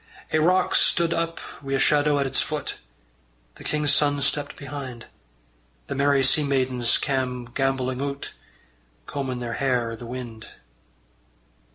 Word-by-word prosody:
Ae 155 Hz, -, +4 dB
rock 180 Hz, +3 st, +3 dB
stud 170 Hz, -1 st, +4 dB
up 165 Hz, 0 st, -2 dB, 0.2 s
wi' 135 Hz, -1 st, -4 dB
a -, -, +3 dB
shadow 145 Hz, +1 st, +3 dB
at 140 Hz, -, +1 dB
its 135 Hz, -, +2 dB
foot: 150 Hz, -2 st, -3 dB, 0.8 s
The -, -, -11 dB
king's 150 Hz, -1 st, +1 dB
son 145 Hz, 0 st, +3 dB
stepped 145 Hz, +1 st, +1 dB
behind: 135 Hz, -4 st, -7 dB, 0.8 s
The -, -, -4 dB
merry 140 Hz, 0 st, +3 dB
sea 150 Hz, +3 st, +5 dB
maidens 130 Hz, -4 st, +2 dB
cam' 130 Hz, -3 st, -2 dB
gambolling 130 Hz, -1 st, 0 dB
oot, 140 Hz, 0 st, -4 dB, 0.7 s
Combin' 130 Hz, -, -4 dB
their 120 Hz, -1 st, -3 dB
hair 125 Hz, -4 st, +1 dB
i' -, -, -5 dB
the 115 Hz, +1 st, -9 dB
wind. 120 Hz, -3 st, -7 dB
135 Hz, 145 wpm, -24 LUFS, 125-145 Hz, 0.8 s, sea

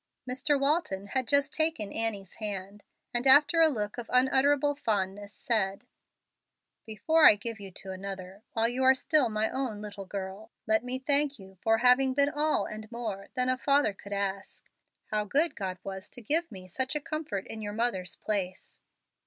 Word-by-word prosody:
Mr. 270 Hz, +3 st, 0 dB
Walton 275 Hz, -, 0 dB
had 260 Hz, -2 st, -1 dB
just 280 Hz, +1 st, +2 dB
taken 315 Hz, -, 0 dB
Annie's 210 Hz, -4 st, -3 dB
hands, 205 Hz, -1 st, -5 dB, 0.3 s
and 240 Hz, +2 st, +1 dB
after 295 Hz, +5 st, +7 dB
a 325 Hz, -, +7 dB
look 210 Hz, -3 st, -3 dB
of 235 Hz, -, -8 dB
unutterable 270 Hz, +3 st, +3 dB
fondness, 205 Hz, -5 st, -2 dB
said, 200 Hz, -2 st, -1 dB, 1.0 s
"Before 305 Hz, +9 st, +4 dB
I -, -, +5 dB
give 220 Hz, +2 st, -6 dB
you 200 Hz, -1 st, -8 dB
to 190 Hz, -, -7 dB
another 190 Hz, 0 st, -7 dB
while 225 Hz, 0 st, +2 dB
you 250 Hz, +2 st, -1 dB
are 260 Hz, 0 st, +6 dB
still 280 Hz, -2 st, +3 dB
my 215 Hz, 0 st, 0 dB
own 255 Hz, -6 st, -3 dB
little 205 Hz, -2 st, -8 dB
girl 195 Hz, +3 st, -6 dB, 0.2 s
let 220 Hz, +1 st, +2 dB
me 250 Hz, +1 st, -2 dB
thank 285 Hz, +1 st, +2 dB
you 190 Hz, -2 st, -15 dB
for 225 Hz, 0 st, +3 dB
having 255 Hz, +2 st, +4 dB
been 280 Hz, 0 st, +3 dB
all 305 Hz, 0 st, +1 dB
and 215 Hz, +1 st, -8 dB
more 215 Hz, -5 st, -5 dB
than 250 Hz, -1 st, +1 dB
a 255 Hz, 0 st, +1 dB
father 280 Hz, -5 st, +2 dB
could 200 Hz, +1 st, -13 dB
ask. 200 Hz, -1 st, -4 dB, 0.4 s
How 210 Hz, -1 st, +1 dB
good 300 Hz, +10 st, +1 dB
God 185 Hz, -2 st, -4 dB
was 190 Hz, -1 st, -7 dB
to 245 Hz, -, -11 dB
give 325 Hz, +8 st, +1 dB
me 185 Hz, -3 st, -10 dB
such 260 Hz, -, -2 dB
a -, -, 0 dB
comfort 305 Hz, -, -4 dB
in 220 Hz, -, -7 dB
your 205 Hz, -1 st, -5 dB
mother's 215 Hz, -5 st, -2 dB
place!" 190 Hz, -4 st, -4 dB
225 Hz, 180 wpm, -29 LUFS, 200-270 Hz, 1.0 s, after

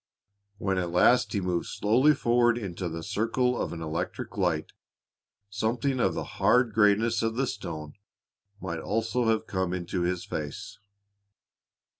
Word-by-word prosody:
When 95 Hz, -2 st, 0 dB
at 90 Hz, -1 st, -2 dB
last 90 Hz, +8 st, +4 dB
he 100 Hz, -, 0 dB
moved 90 Hz, -2 st, -1 dB
slowly 130 Hz, +8 st, +3 dB
forward 120 Hz, -2 st, +3 dB
into 95 Hz, -5 st, -4 dB
the 80 Hz, 0 st, -6 dB
circle 115 Hz, +5 st, 0 dB
of -, -, -2 dB
an 80 Hz, -1 st, -6 dB
electric 80 Hz, +1 st, -4 dB
light, 90 Hz, -6 st, 0 dB, 0.8 s
something 115 Hz, +6 st, -1 dB
of -, -, +1 dB
the -, -, -2 dB, 0.2 s
hard 125 Hz, -3 st, +4 dB
grayness 110 Hz, +1 st, +3 dB
of 115 Hz, 0 st, -1 dB
the 135 Hz, +3 st, +1 dB
stone 80 Hz, -, -6 dB, 0.7 s
might 85 Hz, -4 st, -4 dB
almost 115 Hz, +5 st, -2 dB
have 115 Hz, -3 st, +1 dB
come 95 Hz, -3 st, -2 dB
into 90 Hz, 0 st, -3 dB
his 90 Hz, 0 st, -1 dB
face. 75 Hz, -2 st, -6 dB
100 Hz, 145 wpm, -27 LUFS, 90-115 Hz, 0.8 s, last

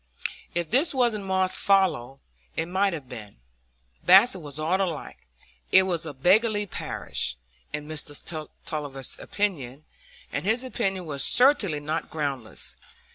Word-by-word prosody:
If 175 Hz, -1 st, +1 dB
this 275 Hz, +5 st, +4 dB
wasn't 235 Hz, -6 st, +1 dB
Moss's 190 Hz, -1 st, +2 dB
fallow, 170 Hz, -, +2 dB, 0.4 s
it 160 Hz, -, 0 dB
might 190 Hz, +2 st, +1 dB
have 150 Hz, -6 st, -6 dB
been; 110 Hz, -5 st, -9 dB, 0.7 s
Basset 190 Hz, +1 st, +6 dB
was 145 Hz, -2 st, -7 dB
all 165 Hz, +5 st, +1 dB
alike; 165 Hz, -, -4 dB, 0.4 s
it 190 Hz, -, +8 dB
was 170 Hz, -3 st, -1 dB
a -, -, -4 dB
beggarly 205 Hz, -, +3 dB
parish, 65 Hz, -, -4 dB, 0.3 s
in 150 Hz, 0 st, -5 dB
Mr 155 Hz, 0 st, -6 dB, 0.2 s
Tulliver's 145 Hz, -4 st, -5 dB
opinion, 155 Hz, -9 st, -3 dB, 0.5 s
and -, -, -2 dB
his 220 Hz, +6 st, +1 dB
opinion 195 Hz, -8 st, -2 dB
was 140 Hz, -3 st, -2 dB
certainly 235 Hz, -, +4 dB
not 155 Hz, +2 st, -3 dB
groundless. 140 Hz, -7 st, -3 dB
170 Hz, 130 wpm, -26 LUFS, 145-195 Hz, 0.7 s, it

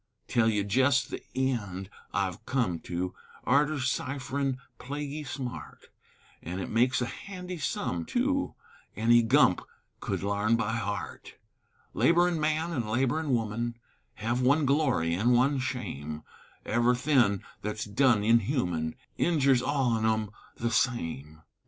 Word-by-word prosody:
Tell 115 Hz, -2 st, +3 dB
ye 105 Hz, -2 st, +1 dB
jest 130 Hz, +6 st, +2 dB
the -, -, -5 dB
eend 105 Hz, -8 st, -1 dB, 0.2 s
I've 95 Hz, +1 st, -2 dB
come 115 Hz, -11 st, 0 dB
to 90 Hz, +2 st, -3 dB, 0.3 s
Arter 145 Hz, +3 st, +2 dB
cipherin' 135 Hz, +1 st, -1 dB, 0.2 s
plaguy 145 Hz, +3 st, -5 dB
smart, 130 Hz, -3 st, -7 dB, 0.5 s
An' 90 Hz, +3 st, -5 dB
it 95 Hz, -, -5 dB
makes 125 Hz, +3 st, +2 dB
a -, -, 0 dB
handy 180 Hz, +4 st, -7 dB
sum, 85 Hz, -, -2 dB
tu, 275 Hz, +3 st, 0 dB, 0.4 s
Any 115 Hz, +3 st, +5 dB
gump 115 Hz, -, +4 dB, 0.4 s
could -, -, -3 dB
larn 100 Hz, +3 st, +2 dB
by 110 Hz, -1 st, 0 dB
heart; 110 Hz, -4 st, -4 dB, 0.6 s
Laborin' 175 Hz, 0 st, +3 dB
man 155 Hz, +2 st, 0 dB
an' 120 Hz, -7 st, -2 dB
laborin' 135 Hz, +7 st, 0 dB
woman, 115 Hz, +1 st, -2 dB, 0.4 s
Hev 120 Hz, +3 st, -1 dB
one 140 Hz, +4 st, +3 dB
glory 135 Hz, -, +2 dB
an' 110 Hz, +8 st, +3 dB
one 135 Hz, +3 st, +3 dB
shame, 90 Hz, -, -4 dB, 0.4 s
Ev'y 120 Hz, +2 st, +3 dB
thin' 120 Hz, -7 st, +2 dB, 0.2 s
thet's 105 Hz, +1 st, -3 dB
done 110 Hz, 0 st, +3 dB
inhuman 105 Hz, -, +1 dB, 0.2 s
Injers 140 Hz, -7 st, +3 dB
all 135 Hz, -2 st, +1 dB
on 110 Hz, -1 st, 0 dB
'em 110 Hz, -2 st, +1 dB, 0.2 s
the 115 Hz, 0 st, -2 dB
same. 80 Hz, -, -1 dB
120 Hz, 130 wpm, -29 LUFS, 105-140 Hz, 0.6 s, Any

